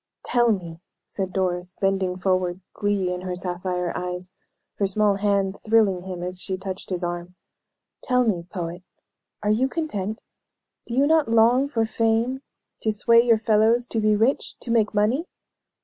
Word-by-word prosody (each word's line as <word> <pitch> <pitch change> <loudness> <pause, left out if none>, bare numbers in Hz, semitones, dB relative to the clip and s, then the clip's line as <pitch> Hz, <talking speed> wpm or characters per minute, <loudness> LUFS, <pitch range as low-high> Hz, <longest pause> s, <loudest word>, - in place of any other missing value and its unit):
"Tell 240 -1 +3
me," 170 -5 -4 0.2
said 190 -2 -4
Doris, 180 -1 -2
bending 190 -2 0
forward, 185 -1 0
glee 200 -3 0
in 180 - -5
her 185 -1 -4
sapphire 180 -1 -3
eyes, 180 +1 -4 0.5
her 200 - +2
small 205 0 +2
hand 200 -1 0
thrilling 215 -5 +3
him 180 -2 -5
as 180 0 -4
she 190 -1 -3
touched 190 0 -6
his 185 -1 -3
arm; 175 +1 -4 0.7
"tell 250 -1 +2
me, 175 -6 -1
poet, 175 -2 -5 0.6
are 210 - +2
you 240 +5 +2
content? 220 - -3 0.6
Do 235 - -4
you 275 +2 +4
not 315 -3 +3
long 235 +4 +4
for 230 -6 0
fame? 225 +4 0 0.4
To 220 - +1
sway 230 +2 +5
your 235 -2 +4
fellows, 220 +2 +3
to 225 - -1
be 215 0 +3
rich, 230 +7 0
to 235 - -4
make 220 -2 +2
money?" 235 - +1
200 Hz, 165 wpm, -24 LUFS, 180-225 Hz, 0.7 s, sway